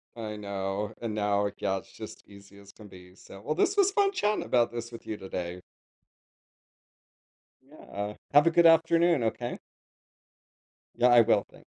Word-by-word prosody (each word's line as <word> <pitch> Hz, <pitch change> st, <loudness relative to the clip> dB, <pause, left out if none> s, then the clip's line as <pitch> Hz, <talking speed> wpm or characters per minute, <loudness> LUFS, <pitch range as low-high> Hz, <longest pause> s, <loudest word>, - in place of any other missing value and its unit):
I 110 Hz, -2 st, -6 dB
know, 100 Hz, 0 st, -4 dB
and 110 Hz, -2 st, -4 dB
now, 100 Hz, -1 st, 0 dB
yeah, 95 Hz, -1 st, -1 dB
it's -, -, -11 dB
just -, -, -11 dB
easy 100 Hz, 0 st, -16 dB
as 100 Hz, 0 st, -16 dB
can 105 Hz, -1 st, -15 dB
be. 90 Hz, -1 st, -15 dB
So, 95 Hz, 0 st, -14 dB
well, 155 Hz, +7 st, -3 dB
this 385 Hz, -, +1 dB
was 395 Hz, -1 st, +3 dB
fun 400 Hz, -1 st, +2 dB
chatting 210 Hz, -, -1 dB
about 120 Hz, -1 st, +1 dB
this 120 Hz, 0 st, -6 dB
with 115 Hz, -, -12 dB
you 110 Hz, -, -4 dB
today. 90 Hz, -2 st, -6 dB, 2.0 s
Yeah, 105 Hz, -7 st, -8 dB, 0.2 s
have 145 Hz, +3 st, +6 dB
a -, -, +4 dB
good 170 Hz, 0 st, +4 dB
afternoon, 165 Hz, -3 st, +4 dB
okay? 120 Hz, +2 st, -3 dB, 1.4 s
Yeah 125 Hz, +1 st, +3 dB
I 120 Hz, -, +8 dB
will 105 Hz, -3 st, +3 dB
tha -, -, -17 dB
110 Hz, 165 wpm, -28 LUFS, 100-155 Hz, 2.0 s, I